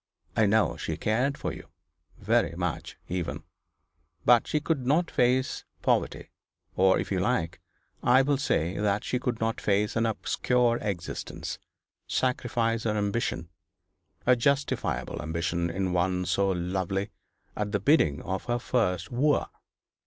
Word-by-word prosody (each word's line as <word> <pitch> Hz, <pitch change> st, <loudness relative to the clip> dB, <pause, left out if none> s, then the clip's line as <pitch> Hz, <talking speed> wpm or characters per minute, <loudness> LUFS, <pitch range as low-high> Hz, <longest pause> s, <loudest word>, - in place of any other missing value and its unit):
I 110 Hz, -2 st, +4 dB
know 110 Hz, +2 st, +2 dB
she -, -, -3 dB
cared 125 Hz, +6 st, 0 dB
for -, -, -3 dB
you -, -, -10 dB, 0.5 s
very -, -, +1 dB
much, -, -, -3 dB
even. 80 Hz, -4 st, -3 dB, 0.8 s
But 120 Hz, -1 st, +5 dB
she 150 Hz, -, +1 dB
could 150 Hz, -3 st, -1 dB
not 155 Hz, +7 st, +2 dB
face 125 Hz, +1 st, +1 dB, 0.2 s
poverty; -, -, 0 dB, 0.4 s
or, 95 Hz, 0 st, +4 dB
if -, -, -3 dB
you 95 Hz, -, +1 dB
like, 90 Hz, -5 st, 0 dB, 0.4 s
I 130 Hz, +2 st, +5 dB
will 140 Hz, 0 st, +1 dB
say 90 Hz, -, 0 dB
that 105 Hz, -1 st, +1 dB
she 125 Hz, -, -1 dB
could 125 Hz, -2 st, -2 dB
not 110 Hz, 0 st, -1 dB
face 105 Hz, +1 st, +1 dB
an 115 Hz, 0 st, +2 dB
obscure 120 Hz, +2 st, +1 dB
existence 95 Hz, -5 st, -4 dB, 0.5 s
sacrifice 115 Hz, -3 st, 0 dB
her 105 Hz, -1 st, +1 dB
ambition, 100 Hz, -5 st, -1 dB, 0.8 s
a 125 Hz, -, +6 dB
justifiable 140 Hz, +3 st, 0 dB
ambition 85 Hz, +2 st, -1 dB
in 95 Hz, +1 st, -1 dB
one 90 Hz, +1 st, +1 dB
so 100 Hz, +3 st, +1 dB
lovely, 95 Hz, +2 st, -1 dB, 0.4 s
at 105 Hz, -1 st, -2 dB
the 105 Hz, -, +1 dB
bidding 95 Hz, -, +3 dB
of 95 Hz, 0 st, -3 dB
her 120 Hz, 0 st, 0 dB
first 100 Hz, -7 st, 0 dB
wooer. 145 Hz, +5 st, +2 dB
105 Hz, 140 wpm, -28 LUFS, 90-125 Hz, 0.8 s, a